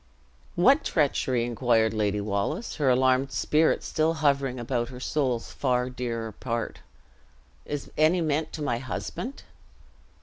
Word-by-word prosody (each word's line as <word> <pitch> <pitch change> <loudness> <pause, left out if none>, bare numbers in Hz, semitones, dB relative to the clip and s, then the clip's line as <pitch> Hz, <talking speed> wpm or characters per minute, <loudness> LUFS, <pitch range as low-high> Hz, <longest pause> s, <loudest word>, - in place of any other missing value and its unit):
"What 265 - +5
treachery?" 130 -6 +1
inquired 115 -2 +2
Lady 105 -1 0
Wallace, 100 - -2
her 145 -4 +2
alarmed 130 +1 +3
spirit 155 +1 +2
still 160 +1 0
hovering 140 -4 +1
about 120 0 -2
her 125 -1 -9
soul's 130 -3 -1
far 125 -1 0
dearer 115 -3 -4
part; 115 +1 -4 0.9
"is 145 -1 -5
any 160 +4 +4
meant 155 -1 0
to 155 - -4
my 120 -5 0
husband?" 235 - -5
130 Hz, 130 wpm, -27 LUFS, 120-150 Hz, 0.9 s, What